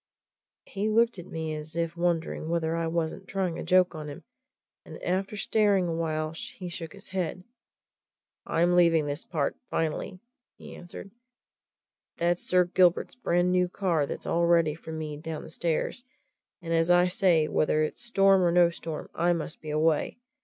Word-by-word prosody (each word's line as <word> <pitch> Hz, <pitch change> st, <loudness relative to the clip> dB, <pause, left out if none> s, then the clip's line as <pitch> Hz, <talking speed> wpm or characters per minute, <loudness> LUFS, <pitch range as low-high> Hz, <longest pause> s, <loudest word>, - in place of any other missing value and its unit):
He 205 Hz, +2 st, -2 dB
looked 230 Hz, -1 st, +2 dB
at 175 Hz, -, -9 dB
me 160 Hz, -1 st, -4 dB
as 155 Hz, +1 st, -7 dB
if 170 Hz, 0 st, -1 dB
wondering 170 Hz, -2 st, -1 dB
whether 165 Hz, -1 st, 0 dB
I 165 Hz, 0 st, -1 dB
wasn't 165 Hz, +3 st, -3 dB
trying 185 Hz, -4 st, -2 dB
a -, -, -4 dB
joke 185 Hz, -1 st, +3 dB
on 155 Hz, -2 st, -6 dB
him, 145 Hz, -, -9 dB, 0.6 s
and -, -, -10 dB
after 195 Hz, +3 st, -1 dB
staring 200 Hz, -3 st, +2 dB
a 165 Hz, -, -1 dB
while 155 Hz, -1 st, -2 dB
he 175 Hz, +3 st, -8 dB
shook 165 Hz, -2 st, -7 dB
his 200 Hz, 0 st, -11 dB
head. 185 Hz, -1 st, -3 dB, 1.0 s
"I'm 175 Hz, +2 st, +2 dB
leaving 165 Hz, -3 st, +4 dB
this 145 Hz, 0 st, -4 dB
part 155 Hz, -5 st, -2 dB
finally," 165 Hz, +3 st, -2 dB, 0.4 s
he -, -, -11 dB
answered. 180 Hz, +2 st, -10 dB, 1.1 s
"That's 175 Hz, +1 st, +1 dB
Sir 180 Hz, -1 st, +3 dB
Gilbert's 180 Hz, 0 st, +2 dB
brand 180 Hz, -7 st, +1 dB
new 180 Hz, 0 st, +2 dB
car 170 Hz, -6 st, 0 dB
that's -, -, -6 dB
all 170 Hz, 0 st, +1 dB
ready 165 Hz, -3 st, +4 dB
for 160 Hz, +1 st, -10 dB
me 155 Hz, -2 st, -5 dB
down 160 Hz, 0 st, -6 dB
the -, -, -11 dB
stairs; 170 Hz, +8 st, -1 dB, 0.6 s
and 165 Hz, 0 st, -2 dB
as 165 Hz, +1 st, +2 dB
I 175 Hz, 0 st, +6 dB
say, 180 Hz, -4 st, +3 dB
whether 155 Hz, 0 st, +1 dB
it's 155 Hz, -, -4 dB
storm 195 Hz, -5 st, +4 dB
or 175 Hz, -1 st, +3 dB
no 175 Hz, 0 st, +5 dB
storm, 165 Hz, -2 st, -6 dB
I 175 Hz, +1 st, +2 dB
must 160 Hz, -2 st, -5 dB
be 155 Hz, -, -7 dB
away. 155 Hz, +1 st, +1 dB
170 Hz, 175 wpm, -28 LUFS, 160-180 Hz, 1.1 s, I